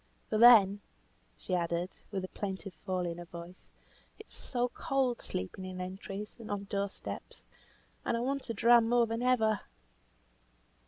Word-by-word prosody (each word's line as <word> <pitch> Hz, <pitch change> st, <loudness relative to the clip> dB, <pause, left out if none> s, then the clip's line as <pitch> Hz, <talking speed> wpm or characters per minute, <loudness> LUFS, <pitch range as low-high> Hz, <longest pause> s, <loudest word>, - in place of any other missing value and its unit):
For 215 Hz, -, +2 dB
then," 210 Hz, -4 st, +8 dB, 0.6 s
she 185 Hz, -, -5 dB
added, 170 Hz, +1 st, 0 dB, 0.2 s
with 190 Hz, -2 st, -3 dB
a -, -, -10 dB
plaintive 195 Hz, -1 st, -5 dB
fall 185 Hz, +1 st, -3 dB
in 170 Hz, 0 st, -4 dB
her 175 Hz, -, -7 dB
voice, 170 Hz, +1 st, -11 dB, 0.5 s
"it -, -, -12 dB
is -, -, -14 dB
so 245 Hz, -1 st, -1 dB
cold 270 Hz, -4 st, 0 dB
sleeping 95 Hz, -, -4 dB
in 185 Hz, 0 st, -6 dB
entries, 195 Hz, +3 st, -6 dB
and 225 Hz, -, -9 dB
on 205 Hz, -1 st, -2 dB
door 200 Hz, 0 st, -2 dB
steps, -, -, -8 dB, 0.6 s
and 230 Hz, -, 0 dB
I -, -, -1 dB
want 275 Hz, +1 st, -2 dB
a -, -, 0 dB
dram 230 Hz, +2 st, +5 dB
more 240 Hz, 0 st, +4 dB
than 230 Hz, +1 st, -3 dB
ever." 225 Hz, -4 st, +3 dB
200 Hz, 165 wpm, -32 LUFS, 185-235 Hz, 0.6 s, then